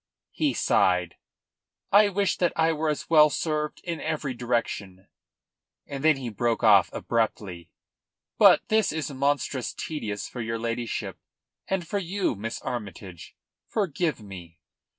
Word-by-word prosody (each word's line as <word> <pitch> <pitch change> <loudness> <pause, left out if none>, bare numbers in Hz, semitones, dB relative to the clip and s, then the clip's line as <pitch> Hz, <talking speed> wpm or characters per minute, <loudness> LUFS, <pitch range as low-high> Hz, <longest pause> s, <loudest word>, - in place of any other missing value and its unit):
He - - 0
sighed. 90 -2 +2 0.7
"I 205 +1 +6
wish 200 0 0
that 175 -2 +2
I 165 0 +2
were 155 0 -1
as 150 - -3
well 155 -2 +6
served 150 0 -2
in 170 -2 -4
every 155 -4 -2
direction." 115 -6 -3 0.8
And 140 0 -6
then 155 -2 +5
he 130 -3 -5
broke 115 +2 -1
off 100 -5 +6
abruptly. 100 -7 -2 0.7
"But - - +6
this 220 -1 +3
is 155 -2 -3
monstrous 140 -1 -1
tedious 105 -10 -4
for 125 - -7
your 115 0 -2
ladyship, 115 -5 -4 0.5
and 190 -3 -2
for 200 +5 -1
you, 190 -1 -1
Miss 110 +3 -5
Armytage. 100 -6 -7 0.3
Forgive 170 - -1
me." 90 -5 -11
125 Hz, 135 wpm, -26 LUFS, 105-160 Hz, 0.8 s, I